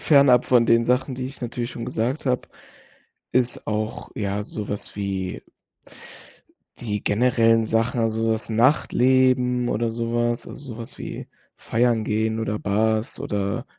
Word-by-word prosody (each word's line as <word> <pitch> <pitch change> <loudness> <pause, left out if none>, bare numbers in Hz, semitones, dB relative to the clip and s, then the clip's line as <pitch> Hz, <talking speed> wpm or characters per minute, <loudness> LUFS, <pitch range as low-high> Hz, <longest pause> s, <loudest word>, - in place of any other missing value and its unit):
fernab 140 -5 +5
von 120 -2 +4
den 115 0 +4
Sachen, 125 +2 +1
die 130 0 -4
ich 135 +1 -7
natürlich 120 0 -4
schon 115 - -6
gesagt 125 +7 -2
habe, 125 -1 0 0.8
ist 125 -1 0
auch, 110 0 -3
ja, 100 0 -2
sowas 105 -1 -5
wie 95 -2 -3 1.4
die 105 -3 -3
generellen 115 0 +3
Sachen, 115 +2 0
also 115 0 +1
das 110 +1 -2
Nachtleben 125 0 +3
oder 115 +1 0
sowas, 120 0 -1
also 130 -4 -8
sowas 115 0 -8
wie - - -7 0.3
Feiern 115 -1 +1
gehen 110 +1 0
oder 105 -1 -2
Bars 110 +4 0
oder, 105 -2 -2
115 Hz, 135 wpm, -23 LUFS, 110-125 Hz, 1.4 s, fernab